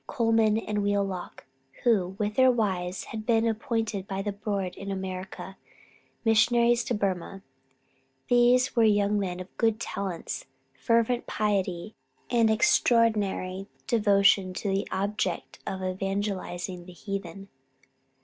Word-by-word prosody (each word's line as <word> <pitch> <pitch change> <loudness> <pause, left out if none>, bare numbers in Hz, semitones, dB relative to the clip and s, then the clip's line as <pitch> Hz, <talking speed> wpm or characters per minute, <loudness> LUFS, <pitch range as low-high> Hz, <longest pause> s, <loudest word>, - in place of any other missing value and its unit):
Colman 225 -4 +2
and 210 -2 -2
Wheelock, 200 -3 -2 0.4
who, 190 -6 +2
with 210 0 -1
their 260 +3 +5
wives, 190 -6 -1
had 220 -1 -4
been 225 0 +2
appointed 225 -4 -2
by 195 0 -3
the 205 - -2
Board 200 -2 -3
in 195 - -7
America, 190 0 -6 0.7
Missionaries 235 +2 +4
to 240 - -1
Burmah. 195 -1 -3 0.8
They 245 0 +5 0.2
were 230 - +4
young 205 -1 +3
men 180 -2 -3
of 185 0 -10
good 225 -1 +2
talents, 195 -6 -4 0.3
fervent 230 - +1
piety, 200 -2 -1 0.4
and 230 -2 +4
extraordinary 220 - +2 0.2
devotion 200 -4 +3
to 200 - -2
the 195 +1 0
object 195 -2 -2
of 190 0 -4
evangelizing 185 -2 -3
the 180 - -10
heathen. 195 0 -6
205 Hz, 120 wpm, -27 LUFS, 190-225 Hz, 0.8 s, their